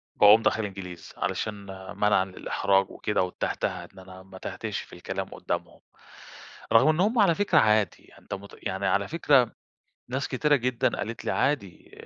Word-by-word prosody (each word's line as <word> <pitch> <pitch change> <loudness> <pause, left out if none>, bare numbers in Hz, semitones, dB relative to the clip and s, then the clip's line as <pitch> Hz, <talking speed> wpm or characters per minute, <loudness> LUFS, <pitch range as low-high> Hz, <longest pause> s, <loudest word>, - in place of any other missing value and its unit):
باقوم 105 +2 +7
داخل 110 0 +1
إنجليزي، 90 -4 -8
علشان 110 - -2 0.4
منعًا 105 -2 +3
للإحراج 95 +1 0
وكده 105 - -1
والتهتهة، 90 - -3
إن - - -14
أنا 95 0 -12
ما 95 0 -13
اتهتهش - - -5
في - - -15
الكلام - - -5
قدّامهم، - - -5 0.9
رغم 115 +5 +6
إن 155 +2 +2
هم 220 +5 +2
على 190 -6 +5
فكرة 205 - +3
عادي، 105 -2 +1
أنت - - -8
مت 100 +1 -8
يعني 95 +1 -2
على 100 0 +1
فكرة، 140 -7 +3 0.6
ناس 130 +3 -2
كتيرة 145 +3 +2
جدًا 125 -2 0
قالت 115 +2 -5
لي - - 0
عادي، 120 -11 -1
105 Hz, 160 wpm, -27 LUFS, 95-130 Hz, 0.9 s, باقوم